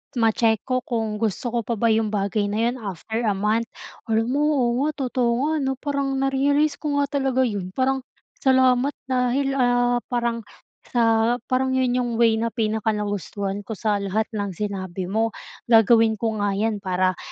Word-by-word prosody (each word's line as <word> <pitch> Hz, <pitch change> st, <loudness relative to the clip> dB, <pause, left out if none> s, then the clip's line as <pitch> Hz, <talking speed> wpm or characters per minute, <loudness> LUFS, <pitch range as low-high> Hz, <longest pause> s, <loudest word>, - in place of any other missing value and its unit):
ma-check 225 Hz, -1 st, +2 dB
ko 255 Hz, -1 st, 0 dB
kung 225 Hz, -3 st, -2 dB
gusto 225 Hz, +2 st, -2 dB
ko 235 Hz, 0 st, -1 dB
pa 235 Hz, -, -1 dB
ba 230 Hz, +2 st, +1 dB
'yong 220 Hz, -1 st, +1 dB
bagay 205 Hz, +1 st, 0 dB
na 205 Hz, +1 st, -2 dB
'yon 245 Hz, -, -4 dB
after 220 Hz, +2 st, -4 dB
a 210 Hz, -, +2 dB
month. 210 Hz, +4 st, 0 dB, 0.4 s
Alam 225 Hz, +1 st, 0 dB
mo, -, -, +1 dB
oo 250 Hz, -4 st, +2 dB
nga, -, -, +1 dB, 0.2 s
totoo 245 Hz, -1 st, +1 dB, 0.2 s
nga, -, -, 0 dB
'no? 265 Hz, -, 0 dB
Parang 280 Hz, -2 st, -1 dB
na-realize 285 Hz, +2 st, +2 dB
ko 285 Hz, -2 st, 0 dB
nga 280 Hz, -, -1 dB
talaga 270 Hz, -2 st, 0 dB
'yon. 200 Hz, -6 st, -3 dB
Parang, 265 Hz, +1 st, +1 dB, 0.4 s
salamat 260 Hz, +1 st, +3 dB, 0.2 s
dahil, 260 Hz, +2 st, +1 dB
ah, 245 Hz, -1 st, +2 dB
parang 235 Hz, -1 st, -1 dB, 0.6 s
sa 230 Hz, 0 st, +3 dB
parang 260 Hz, +1 st, +1 dB
'yon 255 Hz, -1 st, +1 dB
'yong 240 Hz, -1 st, -1 dB
way 225 Hz, -1 st, +3 dB
na 230 Hz, -, 0 dB
pinaka-nagustuhan 210 Hz, -3 st, -2 dB
ko 225 Hz, -, -4 dB
sa 210 Hz, 0 st, 0 dB
lahat 200 Hz, +2 st, 0 dB
ng 205 Hz, -3 st, -3 dB
sinabi 190 Hz, -2 st, -4 dB
mo. 225 Hz, +2 st, 0 dB, 0.3 s
Gagawin 225 Hz, -1 st, +5 dB
ko 225 Hz, +1 st, -1 dB
nga 205 Hz, -1 st, 0 dB
'yan 215 Hz, +1 st, 0 dB
para 185 Hz, -1 st, 0 dB
230 Hz, 175 wpm, -23 LUFS, 210-255 Hz, 0.6 s, Gagawin